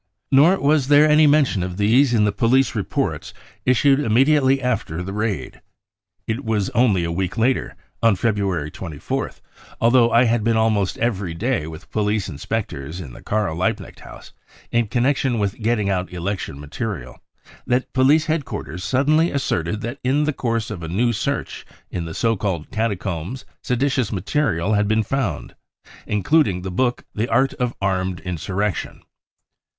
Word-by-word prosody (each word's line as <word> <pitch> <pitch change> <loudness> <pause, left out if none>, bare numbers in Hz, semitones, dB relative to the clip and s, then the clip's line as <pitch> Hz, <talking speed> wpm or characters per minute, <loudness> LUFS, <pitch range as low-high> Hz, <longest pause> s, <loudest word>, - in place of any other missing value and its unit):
Nor 155 +8 +5
was 145 -1 +2
there 145 +1 +6
any 150 0 +5
mention 145 -9 +3
of 90 0 -4
these 120 +6 +4
in 110 -3 +3
the 105 - +2
police 120 +6 +2
reports - - -3 0.3
issued 135 +2 +4
immediately 135 +2 +3
after 115 -10 -2
the 95 +2 -6
raid. 105 -1 -3 0.6
It 115 +5 -3
was 105 -4 -1
only 110 -7 +3
a 85 - -2
week 90 +4 -2
later, 125 +3 +1 0.3
on 115 -3 +4
February 95 -8 -1
24th, 80 -6 -5 0.4
although 120 0 +4
I 120 - +5
had 115 -2 +1
been 115 0 +2
almost 110 -4 +1
every 100 -7 -1
day 100 - -1
with 80 +2 -10
police 105 -1 0
inspectors 80 -2 -4
in 70 -9 -8
the - - -12
Karl 105 -6 -1
Liebknecht 90 +3 -2
House - - -13 0.4
in 120 -1 +1
connection 130 +1 +1
with 100 0 -2
getting 110 -2 +1
out 95 -2 -1
election 90 -5 -4
material, 75 - -6 0.5
that 125 +1 0
police 140 +4 +4
head 155 -1 0
quarters 90 -7 -6
suddenly 155 +6 +2
asserted 105 - -1
that 120 +5 -5
in 135 +4 +2
the 150 0 0
course 115 -4 -2
of 95 -5 -6
a 80 - -5
new 115 +8 +1
search - - -3 0.3
in 85 -2 -3
the 80 - -7
so 115 -1 +1
called 95 -6 -3
catacombs 105 0 -3 0.2
seditious 130 -2 0
material 105 - 0
had 105 0 +2
been 110 +1 +2
found, 115 - -3 0.5
including 105 - +2
the 95 - -4
book 125 +6 0
The 110 +3 -1
Art 130 +4 +2
of 125 -1 -1
Armed 95 -2 -1
Insurrection 95 +2 -3
110 Hz, 160 wpm, -21 LUFS, 95-130 Hz, 0.6 s, there